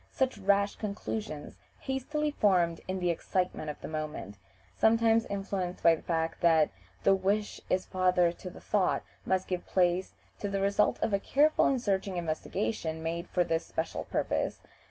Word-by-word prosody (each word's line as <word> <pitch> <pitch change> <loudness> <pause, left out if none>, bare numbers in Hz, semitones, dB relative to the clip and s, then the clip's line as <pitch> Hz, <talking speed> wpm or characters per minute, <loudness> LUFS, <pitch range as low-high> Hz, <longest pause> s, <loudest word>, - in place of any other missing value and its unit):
Such 260 -4 0
rash 200 +1 +2
conclusions, 205 -6 -5 0.2
hastily 300 +3 -1
formed 180 - +2
in 185 0 -2
the 180 -1 +1
excitement 180 -2 -2
of 150 - -6
the - - -6
moment 150 -10 -5 0.4
sometimes 225 0 +4
influenced 195 -2 -3
by 170 - +7
the 160 - -4
fact 165 -1 -2
that 160 -3 +4 0.3
"the 195 - +6
wish 200 +2 0
is 185 0 +1
father 180 -2 +3
to 180 +1 -9
the - - -12
thought" 200 -3 +1 0.2
must 190 0 +1
give 180 -1 -2
place 180 0 +1 0.3
to 205 - -2
the 195 0 -1
results 200 +1 +2
of 210 - 0
a 200 - +3
careful 295 +9 +3
and 265 - +2
searching 195 -4 -1
investigation 160 -1 -2
made 170 +2 -3
for 180 - +2
this 165 -1 0
special 160 - -3
purpose. - - -1
185 Hz, 165 wpm, -30 LUFS, 170-205 Hz, 0.4 s, by